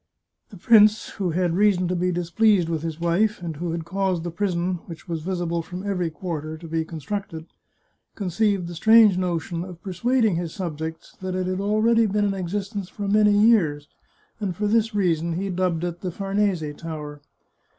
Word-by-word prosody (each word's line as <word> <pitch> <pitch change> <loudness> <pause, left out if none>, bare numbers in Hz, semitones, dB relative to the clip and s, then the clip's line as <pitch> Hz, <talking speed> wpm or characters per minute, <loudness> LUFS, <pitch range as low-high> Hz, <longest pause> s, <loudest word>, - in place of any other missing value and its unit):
The 200 - -12
prince, 215 +2 +5
who 190 -4 -3
had 175 +1 0
reason 195 -2 +3
to 180 - -1
be 180 +1 0
displeased 175 +1 +2
with 160 -2 -1
his 165 -1 -5
wife, 180 +6 +1
and 165 -3 -5
who 170 +1 -3
had 165 -1 -4
caused 185 -1 -1
the 175 - -4
prison, 180 -1 -1
which 165 -3 -10
was 165 -2 -3
visible 175 -1 -2
from 180 +3 -8
every 180 -4 -1
quarter, 160 -2 -5
to 165 +1 -10
be 160 0 -1
constructed, 165 +1 -5 0.7
conceived 200 0 0
the 175 - -6
strange 220 +3 +6
no 180 -2 0
tion 165 +2 -4
of 180 -2 -9
persuading 220 +1 +1
his 170 -2 -4
subjects 160 -2 -5
that 185 -1 -3
it 185 0 -1
had 185 +1 -2
already 220 +2 +3
been 205 +1 +1
in 200 - 0
existence 195 +1 -4
for 205 +1 -5
many 210 0 +4
years, 175 -10 +3 0.5
and 195 -5 -2
for 210 - -2
this 225 +1 +1
reason 170 -4 +1
he 190 +3 -2
dubbed 180 -2 0
it 175 -1 -4
the 185 - -3
Farnese 195 -1 0
Tower. 150 -3 -7
180 Hz, 185 wpm, -24 LUFS, 165-205 Hz, 0.7 s, strange